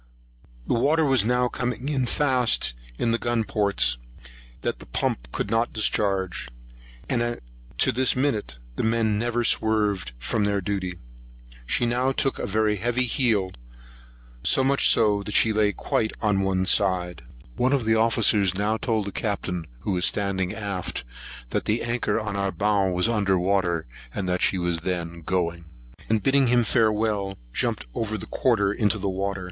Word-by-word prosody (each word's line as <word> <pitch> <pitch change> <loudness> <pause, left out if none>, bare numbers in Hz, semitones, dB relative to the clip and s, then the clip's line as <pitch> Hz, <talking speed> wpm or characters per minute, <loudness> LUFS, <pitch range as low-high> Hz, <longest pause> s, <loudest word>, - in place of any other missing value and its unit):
The - - 0
water 150 +7 +2
was 130 -7 +3
now 125 +1 +2
coming 125 +2 -2
faster 125 - +2 0.2
in 120 - 0
at - - +2
the 115 - +2
gun 120 -1 0
ports 100 - +1 0.6
than - - -1
the - - -12
pumps - - -2
could 100 - -2 0.2
discharge; 95 - 0 0.6
and 120 -1 -1 0.4
to - - +3
this 130 +3 +2
minute 120 - -1 0.2
the - - -1
men 110 -2 +1
never 120 +1 0
swerved 105 - +1
from 65 - -1
their 100 -1 +1
duty. 95 -2 -3 0.7
She 120 - +2
now 125 +3 +1
took 135 0 0
a - - -3
very 105 +1 +1
heavy 120 +4 0
heel, 110 -7 +1 0.9
so 135 - +4
much 140 +1 +4
that 105 -1 +1
she 110 - +5
lay 105 -1 +2
quite 110 +2 -2
down 105 -3 +1
on - - +1
one 95 -1 0
side. 90 -3 +2 0.3
One 130 +2 +1
of 135 -5 +1
the 110 - +3
officers 110 -4 +3
now 105 +3 0
told 110 -3 -1
the 100 - -5
Captain, 95 -5 -3
who 100 - -2
was 90 -1 +1
standing 95 -2 0
aft, 100 -8 -4 0.5
that - - -1
the 110 +3 0
anchor 120 -1 -1
on 110 -2 -4
our 100 -1 -1
bow 105 -1 +1
was 90 +1 +1
under 100 -5 +1
water; 90 -3 0 0.3
that 90 -2 -1
she 95 - +2
was 85 -2 -1
then 85 -1 -4
going; 85 -1 -2 0.4
and, 110 -2 +1
bidding 135 +1 +3
him 120 0 +3
farewell, 105 -3 +1 0.2
jumped - - -1
over 110 -1 -2
the - - -7
quarter 105 -6 +1
into 105 0 +1
the 100 0 -3
water. 100 +1 -2
105 Hz, 165 wpm, -25 LUFS, 95-115 Hz, 0.9 s, she